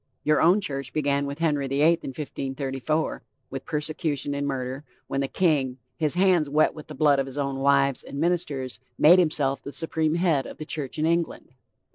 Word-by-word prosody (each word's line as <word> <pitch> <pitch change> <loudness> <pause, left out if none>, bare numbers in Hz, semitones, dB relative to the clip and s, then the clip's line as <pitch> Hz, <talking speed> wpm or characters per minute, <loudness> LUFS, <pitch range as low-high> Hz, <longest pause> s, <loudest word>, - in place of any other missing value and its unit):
Your 150 0 +3
own 180 +6 +5
church 140 -7 -4
began 140 -2 0
with 140 +1 -5
Henry 150 -4 0
the 140 +2 +1
Eighth 165 +1 +4
in - - -5
1534, 135 +1 -3 0.3
with 135 0 -6
persecution 150 -2 -2
and 140 0 -2
murder, 130 0 -3 0.2
when 135 - -2
the 135 - 0
king, 140 -7 +1 0.2
his 155 0 -1
hands 180 -5 +3
wet 150 +2 +3
with 155 - -11
the - - -8
blood 145 -3 +4
of 135 - -1
his 135 +1 -8
own 140 -1 -2
wives 140 -1 +3
and 140 - -7
ministers, 150 -6 -1 0.2
made 175 +4 +7
himself 140 -6 +1
the 140 - -7
supreme 160 0 -1
head 170 -6 +1
of - - -10
the 155 - -6
church 150 -2 -4
in 155 - +1
England. 170 0 -1
145 Hz, 195 wpm, -25 LUFS, 135-160 Hz, 0.3 s, made